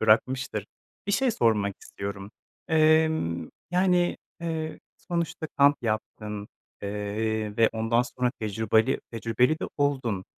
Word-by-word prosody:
bırakmıştır. 110 -1 +2 0.4
Bir 200 - 0
şey 255 +5 +3
sormak 105 - +2
istiyorum. 100 0 -6 0.4
Emm, 155 - +3 0.2
yani, 180 -1 +3 0.2
eee, 160 -2 -3 0.2
sonuçta 170 -2 -3
kamp 145 +1 +6
yaptın, 105 -2 -3 0.3
eee, 105 +1 -2
ve 115 -1 +5
ondan 115 +2 +2
sonra 125 0 -1
tecrübali 110 +3 +2
tecrübeli 115 +4 +2
de - - -3
oldun. 130 -9 0
115 Hz, 110 wpm, -27 LUFS, 105-155 Hz, 0.4 s, kamp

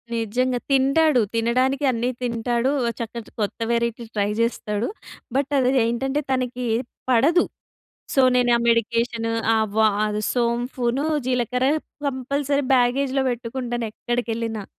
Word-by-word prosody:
నిజంగా 245 +3 0
తింటాడు. 275 +1 +4
తినడానికి 255 +5 +1
అన్నీ 240 +1 -1
తింటాడు, 240 +2 0 0.3
చక్క 230 0 -5 0.3
కొత్త 205 +2 -2
వేరైటీ 235 0 0
ట్రై 205 0 +1
జేస్తాడు. 225 -2 -1 0.5
బట్ 280 +1 -1
అది 255 0 +3
ఏంటంటే, 265 +5 -1
తనకి 250 -1 -1 0.5
పడదు. 300 +9 +4 0.7
సో, 270 - +5
నేనా 245 -1 +4
మెడికేషన్ 230 0 +1 0.3
ఆవ 220 -1 -1 0.6
సోంపును, 245 +2 0 0.2
జీలకర్ర 250 0 0 0.4
కంపల్సరీ 280 +2 -1
బ్యాగేజ్‌లో 260 +2 +2
పెట్టుకుంటాను 240 0 -3
ఎక్కడికెళ్ళినా. 230 -3 -3
245 Hz, 100 wpm, -23 LUFS, 230-260 Hz, 0.7 s, సో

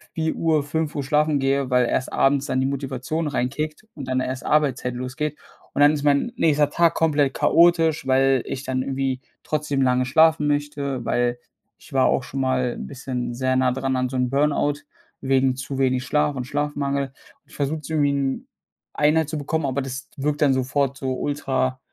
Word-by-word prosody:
04:00, 160 -1 +1
05:00 150 0 -2
schlafen 150 +1 +2
gehe, 135 0 0
weil 125 -1 +3
erst 130 +2 -1
abends 140 0 +2
dann 130 - 0
die 130 - +1
Motivation 140 +3 -3
reinkickt 150 - -3
und 140 -4 -8
dann 130 0 +1
erst 130 0 -4
Arbeitszeit 130 -5 +1
losgeht. 140 +4 -4 0.4
Und - - -3
dann 145 +1 +7
ist 150 -1 -3
mein 145 +11 +2
nächster 150 - +2
Tag 170 +2 +2
komplett 145 -4 +2
chaotisch, 165 -2 +3
weil 135 -1 +3
ich 135 0 -5
dann 130 0 -1
irgendwie 135 -1 -2 0.2
trotzdem 150 -3 -1
lange 125 0 +2
schlafen 160 +3 +4
möchte, 145 -3 -2
weil 120 0 0 0.4
ich - - -17
war 135 -1 +4
auch - - +1
schon 135 +2 -4
mal 130 -2 0
'n - - -6
bisschen 130 -3 -4
sehr 130 +1 0
nah 130 -1 +3
dran 135 +1 -1
an 130 0 0
so 130 - -3
'n 125 -1 +1
Burn 145 +3 +2
out, 145 0 -1 0.4
wegen 135 -1 +2
zu 135 +1 -5
wenig 130 -1 +1
Schlaf 150 +1 +1
und 130 - -3
Schlafmangel. 140 -1 -2 0.3
Ich - - -17
versuche 145 +2 -1
es - - -10
irgendwie 150 -3 +2
in 140 -1 -2 0.5
Einheit 150 +1 +2
zu 155 - -3
bekommen, 150 +1 -2
aber 135 +1 -1
das 135 +1 -6
wirkt 145 +1 -1
dann 140 -3 +4
sofort 135 +1 0
so 130 -1 -2
ultra 130 -3 -1
140 Hz, 190 wpm, -23 LUFS, 130-150 Hz, 0.5 s, dann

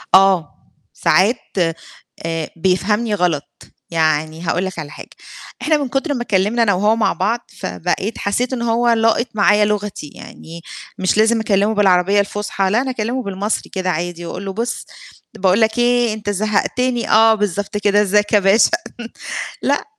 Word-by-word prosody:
آه، 190 -5 +4 0.4
ساعات 205 +7 +3 0.9
آآ، 165 -1 -2
بيفهمني 195 +6 0
غلط. 170 -6 0 0.5
يعني 155 -1 0
هاقول 175 +2 -1
لك 185 -2 -6
على 150 -2 -7
حاجة، - - -11 0.5
إحنا 310 0 +2
من 285 -2 -2
كُتر 275 +4 -1
ما 250 - -3
اتكلِّمنا 220 +2 +1
أنا 205 -3 +3
وهو 210 +4 +2
مع 225 - +1
بعض، 230 +3 -1 0.2
فبقيت 90 - -3
حسّيت 245 +6 -1
إن 240 - -3
هو 235 +1 +1
لاقِط 225 +1 +2
معايا 205 +1 +4
لغتي، 210 -6 -3
يعني 165 +1 -11 0.4
مش 185 +2 +1
لازم 225 +2 +3
أكلِّمه 210 -1 +1
بالعربية 195 0 +3
الفُصحى 200 -1 -1
لا 225 +5 +2
أنا 265 - -3
أكلِّمه 245 +2 -3
بالمصري 200 +1 -3
كده 185 -1 -3
عادي 175 +1 -4
وأقول 185 +3 -6
له 195 - -4
بُصّ، 235 +4 -3 0.5
باقول 190 +1 +2
لك 220 +1 +2
إيه، 240 -2 +2
أنت 215 -1 -5
زهَّقتني 215 +4 -1
آه 225 +1 +6
بالضبط 205 0 -2
كده، 205 0 +2
إزّيك 205 +1 +1
يا 210 - +6
باشا. 195 +3 +4 0.9
لأ، - - 0
205 Hz, 160 wpm, -18 LUFS, 185-225 Hz, 0.9 s, آه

